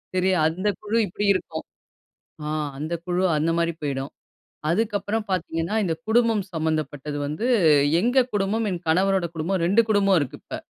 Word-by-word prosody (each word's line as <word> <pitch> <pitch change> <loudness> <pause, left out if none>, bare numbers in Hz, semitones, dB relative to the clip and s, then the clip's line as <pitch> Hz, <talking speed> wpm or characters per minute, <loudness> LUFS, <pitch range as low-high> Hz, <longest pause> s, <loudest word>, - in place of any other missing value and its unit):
சரி 185 +1 +2 0.2
அந்த 180 +6 -2
குழு 215 +2 -1
இப்டி 205 +3 -3
இருக்கும். 160 -4 -4 0.8
ஆ - - -2 0.3
அந்த 155 +4 -3
குழு 180 +1 0 0.2
அந்த 160 +2 +1
மாதிரி 170 0 +1
போய்டும். 140 -1 -3 0.6
அதுக்கப்புறம் 210 +2 0
பார்த்தீங்கன்னா 165 0 -2
இந்த 165 -3 0
குடும்பம் 225 -2 +3
சம்மந்தப்பட்டது 155 -3 -2
வந்து, 155 +11 -3 0.5
எங்க 245 +5 +3
குடும்பம், 205 +3 0
என் 180 -2 -4
கணவரோட 190 +2 +2
குடும்பம் 170 +4 -1
2 200 +6 +4
குடும்பம் 200 -3 +4
இருக்கு 140 -3 -4
இப்ப. - - -6
185 Hz, 145 wpm, -24 LUFS, 160-205 Hz, 0.8 s, 2